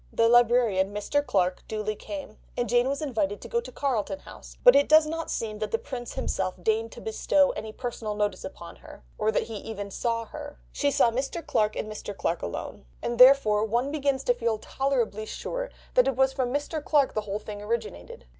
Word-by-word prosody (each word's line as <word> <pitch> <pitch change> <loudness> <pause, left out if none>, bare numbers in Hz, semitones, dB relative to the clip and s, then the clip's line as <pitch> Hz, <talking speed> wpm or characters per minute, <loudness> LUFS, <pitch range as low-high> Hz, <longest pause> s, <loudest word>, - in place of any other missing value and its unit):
The 230 - +3
librarian, 235 -5 +4
Mr. 290 +8 0
Clarke, 185 -8 +1
duly 215 0 -2
came, 285 -2 -8 0.2
and 245 - 0
Jane 240 +3 +3
was 280 +3 -2
invited 210 -8 -1
to - - -8
go 470 0 0
to 475 - -10
Carlton 220 -8 -1
House, - - -13
but - - +9
it 280 - +4
does 310 0 +7
not 325 +1 -4
seem 215 -2 -3
that 215 -1 -2
the 225 - +1
Prince 240 0 -7
himself 185 -1 -2
deigned 225 +2 +1
to - - -10
bestow 280 +6 +2
any 220 - -6
personal 225 -3 -4
notice 205 -2 -1
upon 170 -2 -9
her, - - -14 0.2
or 215 - +2
that - - +1
he 225 -2 -6
even 205 -1 -6
saw 230 +2 -1
her; 290 +3 -9
she 285 - +1
saw 240 -4 +3
Mr. 270 +7 -3
Clarke 215 0 +1
and - - -3
Mr. 210 -1 -7
Clarke 170 - -1
alone, 65 -6 -6 0.2
and 240 0 -2
therefore 250 -5 +7
one 240 +5 0
begins 280 -3 0
to 245 - +3
feel 230 -2 -1
tolerably 235 -3 -1
sure - - -4 0.2
that - - +5
it 270 - +1
was 265 +1 +3
from 260 -2 -1
Mr. 290 +2 -2
Clarke 290 -3 +3
the 215 - 0
whole 205 -1 -3
thing 210 -1 -8
originated. 210 - -4
230 Hz, 210 wpm, -27 LUFS, 210-275 Hz, 0.2 s, but